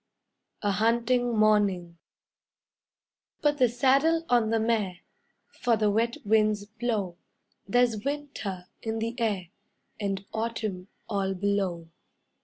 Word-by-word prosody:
A 205 - +2
HUNTING 235 +3 +2
MORNING 200 -5 +2 1.4
Put 295 -1 +2
the 250 -2 +5
saddle 275 +7 +3
on 235 -3 +3
the 225 0 +2
mare, 215 -5 0 0.6
For 235 -2 +3
the 210 -1 +2
wet 230 +3 +1
winds 215 -1 +3
blow; 210 -5 -3 0.5
There's 230 -1 +2
winter 275 -11 -4 0.2
in 225 0 -3
the 225 +1 -2
air, 200 -7 -1 0.5
And 195 -1 -2
autumn 220 -4 -3 0.2
all 195 -3 -1
below. 190 -4 -1
220 Hz, 110 wpm, -28 LUFS, 200-235 Hz, 1.4 s, the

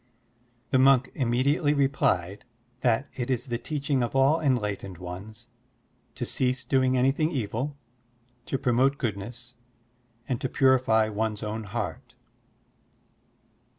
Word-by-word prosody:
The 130 - +4
monk 135 -1 +5
immediately 140 +4 +1
replied 105 -9 +1 0.4
that 125 +2 +1
it 125 -1 -4
is 125 -3 -1
the 120 -3 -3
teaching 140 0 -1
of 120 +2 -2
all 140 +5 +4
enlightened 105 - -1
ones 95 +6 -8 0.7
to 130 -1 -3
cease 130 +1 0
doing 130 -1 +2
anything 135 +5 +2
evil, 130 +1 -3 0.7
to 135 - -1
promote 130 +2 +2
goodness, 120 +2 -5 0.7
and 125 -3 -2
to 130 - -1
purify 125 -5 +3
one's 110 0 -2
own 110 +1 -4
heart. 100 -4 -5
125 Hz, 115 wpm, -27 LUFS, 110-135 Hz, 0.7 s, monk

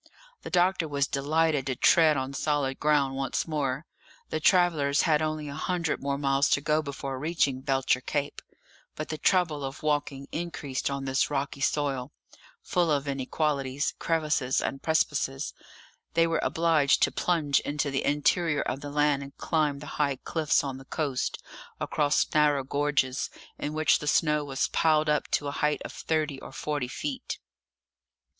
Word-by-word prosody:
The - - -7
doctor 180 -1 +2
was 140 -2 +1
delighted 145 0 +1
to 130 - -1
tread 155 +2 +5
on 130 +1 -3
solid 140 -2 -1
ground 145 -3 +2
once 135 +4 -2
more; 145 -1 -2 0.5
the 155 - 0
travellers 155 -5 +3
had 155 -2 +3
only 155 -1 -2
a 140 - -6
hundred 170 +1 -2
more 140 0 -1
miles 135 0 +2
to - - +3
go 150 +2 +1
before 140 -2 -5
reaching 145 -4 0
Belcher 135 -2 +1
Cape; 145 +2 -3 0.5
but 155 - -5
the 155 - -4
trouble 165 -5 +2
of 135 +2 -6
walking 145 -2 -1
increased 155 -6 -3
on 140 -1 -3
this 135 0 +1
rocky 140 -1 -3
soil, 140 -2 0 0.5
full 175 -2 +1
of 145 -1 0
inequalities, 140 0 -1
crevices, 155 -5 +1
and 135 - -3
precipices; 145 -3 0 0.6
they 165 0 +5
were 165 0 0
obliged 160 -4 +3
to - - +3
plunge 155 -6 +1
into 145 0 -2
the 135 - -1
interior 150 +2 +2
of 135 - -3
the 145 - -6
land 145 -1 +2
and 140 0 -10
climb 150 -3 0
the 145 - -9 0.2
high 140 -2 +2
cliffs 155 +3 0
on 135 -2 -4
the 135 - -13
coast, 140 -3 -2 0.4
across 145 -1 +1
narrow 150 -2 +3
gorges, 140 -2 0 0.3
in 150 - -3
which 155 0 +3
the 150 - -6
snow 150 -1 +2
was 140 -1 -1
piled 155 -1 +2
up 150 -1 +1
to 145 - 0
a - - -2
height 150 +1 0
of - - -7
thirty 155 -4 -2
or - - -9
forty 145 -4 -3
feet. 260 - -4
145 Hz, 165 wpm, -28 LUFS, 140-155 Hz, 0.6 s, tread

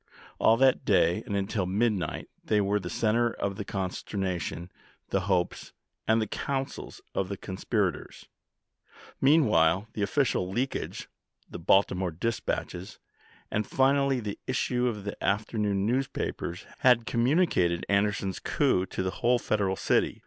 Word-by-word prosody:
All 115 - +5
that 130 +1 +4
day 85 +6 +3
and 100 - -2
until 100 -1 -1
midnight 100 -3 0 0.2
they 105 - +2
were 100 +1 +1
the 90 -3 -6
center 115 +4 +2
of 100 -1 -3
the 105 - -4
conster 95 +1 -4
nation, 90 -2 -3 0.4
the 95 - +1
hopes, 90 -2 -1 0.3
and 110 +1 +4
the 110 - +1
counsels 135 +5 -4
of 95 -1 -1
the 100 - -4
conspir 100 +1 -1
ators. - - -12 1.0
Meanwhile 110 - +4
the 105 - -4
official 100 -4 +1
leakage, 125 +7 -3 0.4
the - - -8
Baltimore 95 +1 +3
dispatches, 90 0 -3 0.5
and 105 0 -1
finally 135 0 +2
the 105 -3 -5
issue 125 -1 0
of 105 -4 -3
the 100 - -6
afternoon 105 -1 0
newspapers 120 -7 -2
had 125 -3 +4
communicated 120 - +2
Anderson's 100 -1 0
coup 110 -10 +1
to - - -3
the 95 - -1
whole 120 +1 +4
Federal 100 -5 0
city. - - +1
105 Hz, 140 wpm, -28 LUFS, 95-120 Hz, 1.0 s, All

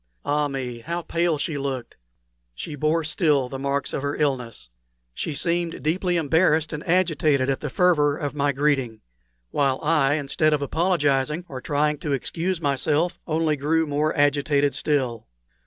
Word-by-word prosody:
Ah 150 0 +1
me, 130 -4 -5
how 170 +7 -4
pale 170 -1 0
she 145 0 -2
looked! 135 -3 -4 0.6
She 150 - -6
bore 155 +3 +1
still 150 -4 +1
the 135 - -6
marks 140 +1 -1
of - - -2
her 145 +1 -2
illness. 125 - -2 0.5
She 150 - -4
seemed 170 +2 -1
deeply 175 +3 0
embarrassed 160 0 +2
and 150 - -5
agitated 155 -6 +2
at 135 - -2
the 150 - -4
fervor 150 -3 +3
of 145 -2 -3
my 145 -1 +1
greeting; 135 -5 0 0.5
while 135 -2 +1
I, 150 -2 +3
instead 155 +1 +1
of 150 - 0
apologizing 150 -1 +1
or 130 -2 -7
trying 150 +1 0
to 150 -2 -2
excuse 170 +6 -2
myself, 150 +3 0
only 160 -1 +1
grew 160 +3 +1
more 150 +1 0
agitated 145 0 +2
still. 130 - -1
145 Hz, 155 wpm, -24 LUFS, 140-160 Hz, 0.6 s, fervor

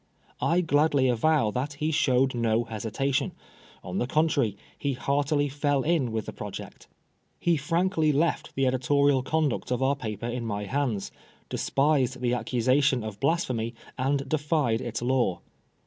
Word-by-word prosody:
I 175 +2 +3
gladly 145 -4 +3
avow 120 -1 +2
that 135 +6 -2
he 150 +3 -1
showed 130 -4 +2
no 115 -1 +1
hesita 115 +5 -2
tion; 140 +1 0 0.5
on 90 +2 -3
the 120 - 0
contrary, 140 -8 +1 0.2
he 140 -1 -2
heartily 145 +2 0
fell 145 -1 0
in 150 -7 +1
with 110 -1 -2
the - - -7
project. - - -8 0.5
He 170 -1 +2
frankly 165 +2 +1
left 155 +4 0
the 135 - +1
editorial 135 +2 +3
conduct 155 0 -1
of 125 +1 0
our 135 +2 +2
paper 110 -4 -5
in 120 0 -3
my 105 -2 -3
hands, 120 -3 -2 0.4
despised 135 -3 +1
the 125 -1 0
accusation 125 +2 +2
of 105 -2 -6
Blas 165 +5 +1
phemy, 115 -1 -3 0.2
and 135 +1 0
defied 150 -6 +1
its 115 -1 -4
law. 125 -7 +1
135 Hz, 155 wpm, -27 LUFS, 120-145 Hz, 0.5 s, I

